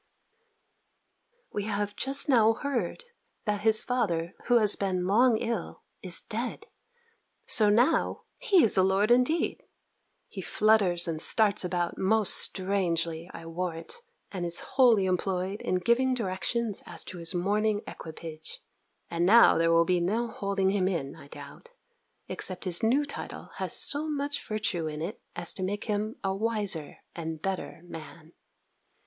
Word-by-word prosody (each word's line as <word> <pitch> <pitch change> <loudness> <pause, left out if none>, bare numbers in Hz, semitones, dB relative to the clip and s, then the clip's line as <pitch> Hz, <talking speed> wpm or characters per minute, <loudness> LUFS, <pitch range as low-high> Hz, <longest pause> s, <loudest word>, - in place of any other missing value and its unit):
We 205 - -2
have 205 -1 -2
just 275 +3 0
now 225 -5 +5
heard 255 - -3 0.4
that 210 -2 -1
his 220 0 +4
father, 180 -9 -1
who 245 - +4
has 210 -3 +4
been 185 -2 -1
long 225 +4 +4
ill, 230 +1 -4 0.2
is - - 0
dead. - - -5 0.8
So 215 -3 +4
now, 245 +10 +2 0.2
he 410 -9 +4
is 220 - +3
a - - +6
lord 195 +4 +2
indeed! 250 +7 +2 0.7
He 195 - -8
flutters 195 -4 +3
and 160 -2 -3
starts 210 0 +4
about 175 -1 -2
most 210 +1 +2
strangely, 170 -3 0
I 165 - -10
warrant, 170 - -5 0.3
and 185 -3 -4
is 170 0 0
wholly 240 -7 +5
employed 185 +2 -1
in 185 - -1
giving 235 +8 +2
directions 210 +1 -1
as 170 -2 -4
to 180 - -9
his 165 +1 -1
mourning 205 +3 0
equipage. 160 -1 -8 0.5
And 170 0 0
now 220 0 +6
there 165 0 +3
will 165 0 +4
be 180 0 +1
no 215 +7 0
holding 195 -2 -1
him 195 -2 +1
in, 155 -8 -3
I - - -14
doubt; 480 - -12 0.6
except 185 - -2
his 175 -2 -2
new 260 +6 +2
title 285 - -8
has - - -1
so 305 +2 +2
much 285 -1 -2
virtue 205 -6 -2
in 150 -1 -5
it, 170 +7 -5
as 175 -1 0
to - - -7
make 205 +2 -3
him 215 +1 -2
a 195 -1 0
wiser 205 -7 -1 0.2
and 160 -2 -5
better 190 -2 -4
man. 165 -1 -11
195 Hz, 150 wpm, -28 LUFS, 175-225 Hz, 0.8 s, a